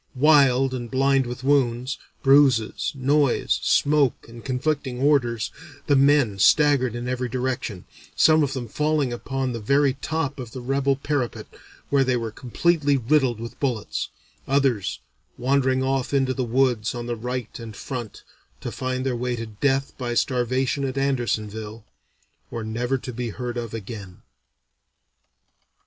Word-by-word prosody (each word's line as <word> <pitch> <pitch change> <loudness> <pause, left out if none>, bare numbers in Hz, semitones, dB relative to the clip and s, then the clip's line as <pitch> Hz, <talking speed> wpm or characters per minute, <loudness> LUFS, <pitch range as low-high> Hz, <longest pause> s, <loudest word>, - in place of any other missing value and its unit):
Wild 135 -2 +4
and 120 -2 -5
blind 135 0 +2
with 125 +1 -6
wounds, 130 -2 +1 0.2
bruises, 135 -5 +4
noise, 140 0 +2
smoke, 145 -3 +2
and 115 0 -12
conflicting 130 -1 -2
orders, 120 -6 +1 0.3
the 145 - +3
men 135 -7 +3
staggered 140 -1 +4
in 120 +1 -4
every 125 0 -2
direction, 125 -6 -3 0.3
some 155 0 +5
of 140 -3 0
them 125 -3 -4
falling 150 +1 0
upon 130 +1 -3
the 115 - -4
very 140 +5 +2
top 145 0 -3
of 120 -3 -7
the 130 - -6
rebel 135 +2 +1
parapet, 140 -3 -2 0.5
where 140 -1 +4
they 130 -1 +1
were 115 -2 -4
completely 145 +4 +1
riddled 130 -2 +2
with 115 0 -8
bullets, 125 -7 -2 0.4
others 135 -8 +1 0.4
wandering 130 +1 +1
off 135 +1 0
into 135 -1 +2
the 130 - -2
woods 120 -2 +1
on 120 -1 -5
the 120 0 -2
right 125 +1 -5
and 115 -2 -8
front, 120 -4 -6 0.4
to - - -5
find 130 0 -3
their 130 -2 0
way 125 +1 -2
to 115 -1 -5
death 135 +6 -1
by 120 -2 -2
starvation 130 +2 0
at 135 0 -3
Andersonville, 110 -5 -2 0.6
or 115 -2 -5
never 120 +4 -1
to 125 -1 -7
be 120 0 -3
heard 120 +2 -5
of 120 -2 -4
again." 100 -4 -8
130 Hz, 150 wpm, -24 LUFS, 120-140 Hz, 0.6 s, some